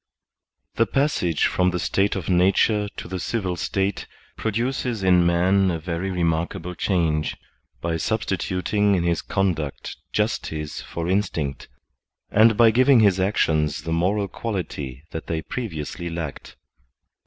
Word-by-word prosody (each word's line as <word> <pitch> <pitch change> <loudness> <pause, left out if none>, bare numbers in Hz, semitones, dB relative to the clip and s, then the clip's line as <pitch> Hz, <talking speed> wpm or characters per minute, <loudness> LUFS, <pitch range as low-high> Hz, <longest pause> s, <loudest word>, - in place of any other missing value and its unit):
The 115 - +3
passage 135 - +1
from 90 0 +2
the 90 - -1
state 95 +3 +1
of 95 -4 -4
nature 100 +3 +3
to - - -6
the 95 +1 -4
civil 95 -1 -2
state 95 +3 -2 0.3
produces 115 0 -2
in 90 -2 +5
man 95 +3 +3
a 85 - -1
very 85 +3 -3
remakable 85 0 -1
change, 80 -4 0 0.4
by 85 -1 -1
substitut 90 +3 -2
ing 105 -1 +4
in 90 - 0
his 85 -1 +1
conduct 85 -8 -2
justice 75 -1 -2
for 85 0 -5
instinct, 85 -7 -1 0.6
and 110 +1 +5
by 115 -1 +7
giving 130 +1 +5
his 100 -3 +4
actions 80 -6 +1
the 80 0 -2
moral 100 +5 +1
quality 80 - -5
that 80 - -6
they 80 -1 -2
previously 85 - -5
lacked. 85 -4 -6
90 Hz, 135 wpm, -23 LUFS, 80-100 Hz, 0.6 s, by